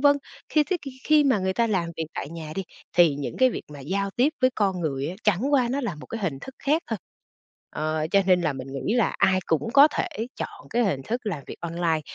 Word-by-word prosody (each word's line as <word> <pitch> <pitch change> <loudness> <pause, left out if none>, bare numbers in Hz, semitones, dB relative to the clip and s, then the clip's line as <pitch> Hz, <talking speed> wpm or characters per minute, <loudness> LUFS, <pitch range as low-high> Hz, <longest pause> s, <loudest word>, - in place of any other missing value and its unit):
vân. 285 0 +6 0.3
Khi 305 -1 +3
thế 370 - 0
thì 275 - -5
khi 305 -1 +5
mà 260 -7 +3
người 190 0 0
ta 235 +3 +2
làm 185 -6 0
việc 160 - -2
tại - - -4
nhà 160 -2 -7
đi 195 - -1 0.3
thì 170 -5 +6
những 140 -1 -5
cái 260 0 +5
việc - - -5
mà 140 - -9
giao 195 +7 -1
tiếp 250 +8 +3
với 255 - +5
con 195 -4 +1
người 140 -2 -1
á, 180 - -5
chẳng 215 +8 +2
qua 255 -4 +4
nó 275 +3 -1
là 215 - -2
một 150 - -11
cái 225 - -5
hình 155 -9 -2
thức 265 - -9
khác 305 +4 +1
thôi. 225 - -1 0.7
Ờ, 155 0 -1
cho 200 -1 +5
nên 180 -1 +5
là 150 - +1
mình 135 0 -7
nghĩ 170 - -1
là 235 -4 +2
ai 185 -1 +4
cũng 165 +8 0
có 285 +2 +8
thể 365 - -2 0.3
chọn - - -7
cái 240 +1 +2
hình 180 -9 0
thức 240 - -2
làm 160 -9 -2
việc - - -8
online 170 -1 0
195 Hz, 255 wpm, -25 LUFS, 160-250 Hz, 0.7 s, có